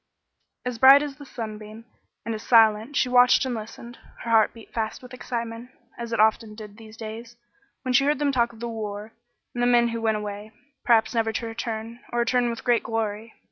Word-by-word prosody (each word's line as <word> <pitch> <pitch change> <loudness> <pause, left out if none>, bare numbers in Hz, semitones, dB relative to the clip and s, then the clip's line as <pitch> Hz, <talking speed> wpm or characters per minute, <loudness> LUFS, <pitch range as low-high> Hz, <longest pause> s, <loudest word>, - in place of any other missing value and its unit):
As 250 -2 -4
bright 270 +3 +8
as 285 -2 -6
the 285 -2 -12
sunbeam, 215 -1 -8 0.4
and 230 - -2
as 215 - -6
silent, 225 +3 +4
she 260 - +2
watched 250 +1 +5
and 255 - -2
listened. 235 +2 -9 0.2
Her 230 - -4
heart 225 -1 +4
beat 230 -2 -16
fast 220 +1 -3
with 250 0 -12
excitement, 235 -1 -5 0.3
as 235 -1 -7
it 230 - -1
often 215 0 +2
did 210 -1 -11
these 220 -1 -13
days, 230 +2 -8 0.5
when 255 -1 -1
she 270 +2 +4
heard 295 +1 +2
them 285 0 +1
talk 235 -3 +1
of 225 -1 -16
the 235 - -3
war 215 -1 -6 0.4
and 240 - -3
the 245 - +3
men 240 -1 +4
who 230 0 -4
went 220 -1 +1
away, 210 +1 -7 0.3
perhaps 225 -1 +3
never 225 -1 +1
to 230 - -3
return, 225 0 -5
or 240 0 0
to 250 - -1
return 245 -1 +2
with 230 - -6
great 240 -2 +2
glory. 220 0 -4
230 Hz, 215 wpm, -24 LUFS, 220-245 Hz, 0.5 s, bright